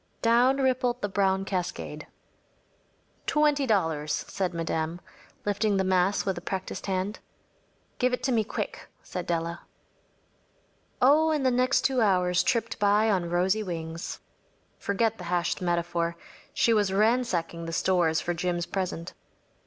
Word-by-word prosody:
‚ÄĚ - - -40
Down 240 +3 +4
rippled 255 -2 +1
the - - +2
brown 195 -1 +1
cascade. 180 -3 -4 1.2
“Twenty 295 -3 +2
dollars,‚ÄĚ 160 -8 0
said 190 -2 -1
Madame, 165 0 -2 0.5
lifting 205 0 +1
the 190 - +2
mass 185 +1 +2
with 195 -1 0
a - - -18
practised 190 +1 -5
hand. 190 +2 -2 0.8
“Give 250 0 +2
it 250 0 -2
to 260 - +1
me 225 -3 +3
quick,‚ÄĚ 215 - -6
said 180 -1 -5
Della. 170 0 -2 1.4
Oh, 305 +5 +5
and 300 -4 0
the 260 - +4
next 255 +2 +2
two 260 -2 +1
hours 180 -4 +3
tripped 230 -1 -1
by 210 +2 +3
on 180 -4 0
rosy 185 +5 +1
wings. 165 -3 -5 0.6
Forget 220 +2 0
the 180 - -7
hashed 175 +1 -1
metaphor. 170 -1 -1 0.3
She 230 - +3
was 205 -3 +2
ransacking 195 -6 +1
the - - -4
stores 165 -2 +2
for 175 - -2
Jim’s 175 0 -1
present. 180 -2 -4
190 Hz, 145 wpm, -27 LUFS, 175-230 Hz, 1.4 s, Oh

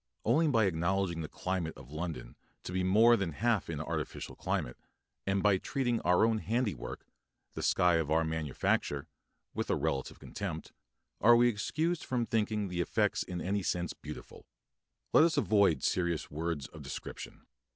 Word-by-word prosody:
Only 160 +1 +4
by 115 -7 +3
acknowledging 85 0 0
the 80 - -4
climate 90 -3 -3
of 70 0 -13
London 80 -5 -5 0.3
to - - -6
be 95 +1 0
more 110 +6 +6
than 95 -7 -2
half 110 +2 0
an 80 -3 -3
artificial 75 - -4
climate, - - -2 0.5
and 95 0 +1
by 100 -2 +5
treating 120 -2 -1
our 90 +4 +4
own 110 -1 +1
handiwork 110 +4 -2 0.5
the - - -5
sky 90 -1 +3
of 80 -3 -1
our 80 +1 +3
manufacture 75 -1 -1 0.5
with - - -3
a - - +3
relative 65 -1 -2
contempt, 85 -6 -6 0.5
are 120 +2 +7
we 120 +1 +5
excused 155 +9 -1
for 125 -2 -1
thinking 105 -2 0
the 90 -1 -2
effects 105 +3 +1
in 90 -2 -4
any 100 +2 0
sense 90 -2 -1
beautiful. - - -10 0.7
Let - - +8
us 165 0 +2
avoid 100 - +3
serious 85 -3 0
words 80 -1 -3
of - - -11
description. - - -8
95 Hz, 160 wpm, -32 LUFS, 80-110 Hz, 0.7 s, Let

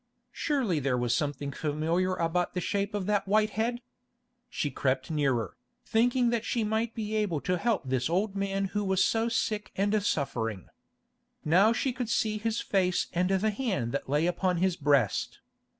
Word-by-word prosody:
Surely 255 - 0
there 135 -2 0
was 120 -1 +1
something 145 0 -2
familiar 160 +6 0
about 175 +1 -1
the - - +1
shape 200 +3 -1
of 200 -2 -2
that 205 -1 0
white 215 +1 +3
head. 235 +3 -1 0.7
She 145 -10 -2
crept 130 +2 -1
nearer, 135 -7 0 0.3
thinking 245 +1 +2
that 235 -2 0
she 230 -1 -1
might 220 +2 -1
be 220 -1 -3
able 205 -8 0
to 180 - 0
help 225 -6 +1
this 130 +1 0
old 195 +4 0
man 195 0 -1
who 205 0 0
was 190 -1 +2
so 225 +1 +1
sick 215 -2 -1
and 205 +2 +1
suffering. 115 - -2 0.8
Now 185 +8 +5
she 250 +2 0
could 245 -2 -4
see 215 -1 0
his 225 +1 -1
face 185 -3 +1
and 180 +1 +1
the 195 +3 +2
hand 200 - -2
that 140 - -3
lay 150 +3 +2
upon 180 +1 0
his 185 0 +1
breast. 145 -4 +1
190 Hz, 175 wpm, -29 LUFS, 155-215 Hz, 0.8 s, Now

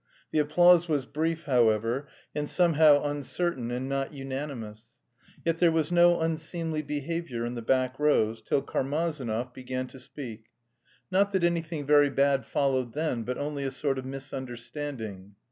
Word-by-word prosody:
The 155 - +2
applause 175 +3 +5
was 145 -4 +1
brief, 160 +4 -2
however, 120 -1 +2 0.3
and 150 0 -3
somehow 155 -4 +5
uncertain 145 -2 -2
and 125 +2 -3
not 135 0 -2
unanimous. 130 -5 -6 0.5
Yet 165 0 +1
there 170 -2 +5
was 160 0 0
no 175 0 +5
unseemly 160 0 -2
behaviour 145 -4 -3
in 120 - -3
the 120 - -5
back 130 +2 +1
rows, 115 -7 +2
till 135 - 0
Karmazinov 135 -5 -2
began 130 0 -4
to 135 - -12
speak, 120 -4 -9 0.7
not 200 +2 +2
that 190 -2 +1
anything 165 -3 0
very 145 0 +5
bad 140 -1 +2
followed 130 -4 0
then, 150 -6 -1
but 125 +2 -3
only 145 -1 -3
a 135 - -1
sort 135 0 -1
of 130 - -7
misunderstanding. 130 -6 -6
140 Hz, 150 wpm, -28 LUFS, 125-155 Hz, 0.7 s, applause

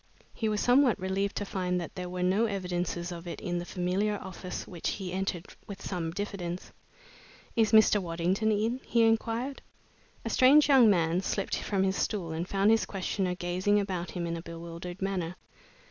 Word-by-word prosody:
He 220 - -1
was 210 -1 0
somewhat 250 -1 +4
relieved 190 +2 -1
to 205 - -2
find 180 -2 -1
that 170 - -6
there 180 -1 -5
were 180 0 -3
no 195 +5 +3
evidences 180 -3 -3
of 170 0 -7
it 170 - -5
in 175 -2 -2
the 175 - -5
familiar 185 +4 0
office 185 -1 -7
which 175 -3 -3
he 185 -3 -5
entered 190 -2 -2 0.2
with 200 -2 -7
some 175 -5 -3
diffidence. 180 -1 -5 0.8
"Is 225 -2 +3
Mr. 220 -2 +6
Waddington 180 +5 0
in?" 220 +4 0
he 235 -1 +2
inquired. 230 +4 0 0.6
A - - -1
strange 285 +4 +6
young 265 -6 +7
man 170 -2 +2
slipped 195 0 -1
from 195 -2 0
his 190 0 +1
stool 185 -7 -1
and 165 +3 -3
found 200 +2 +3
his 225 - +3
questioner 190 -1 -2
gazing 185 +4 +1
about 185 -3 -3
him 175 -2 -4
in 170 0 -2
a 165 - -5
bewildered 170 +2 -7
manner. 180 -3 -2
190 Hz, 180 wpm, -29 LUFS, 175-210 Hz, 0.8 s, young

